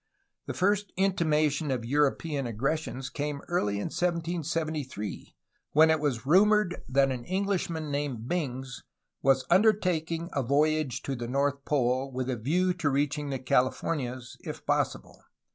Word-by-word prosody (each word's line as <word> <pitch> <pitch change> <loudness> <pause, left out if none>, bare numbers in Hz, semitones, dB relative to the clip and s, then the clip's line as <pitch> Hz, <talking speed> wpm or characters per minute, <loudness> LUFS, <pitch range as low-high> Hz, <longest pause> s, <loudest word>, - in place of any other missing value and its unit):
The - - -4
first 205 +2 +1
intimation 155 -6 +1
of 125 -3 -1
European 145 +1 +1
aggressions 135 +3 -2
came 145 -1 -4
early 140 - 0
in 100 - -2
1773, 160 - -2 0.4
when 160 +2 +6
it 160 - +2
was 135 -6 -1
rumored 195 +3 +4
that 135 +1 +3
an 125 -2 -4
Englishman 180 -5 -1
named 140 -5 -3
Bings 135 -6 -3 0.4
was 135 -1 +3
undertaking 175 -4 +2
a 140 - +1
voyage 140 0 +1
to 135 - -2
the 120 -1 -5
North 140 +2 0
Pole, 130 -1 +1
with 130 0 -2
a - - -1
view 175 +11 +1
to 150 - 0
reaching 145 +1 0
the 135 - -1
Californias 130 0 -1
if - - -8
possible. - - -1
145 Hz, 140 wpm, -28 LUFS, 130-165 Hz, 0.4 s, when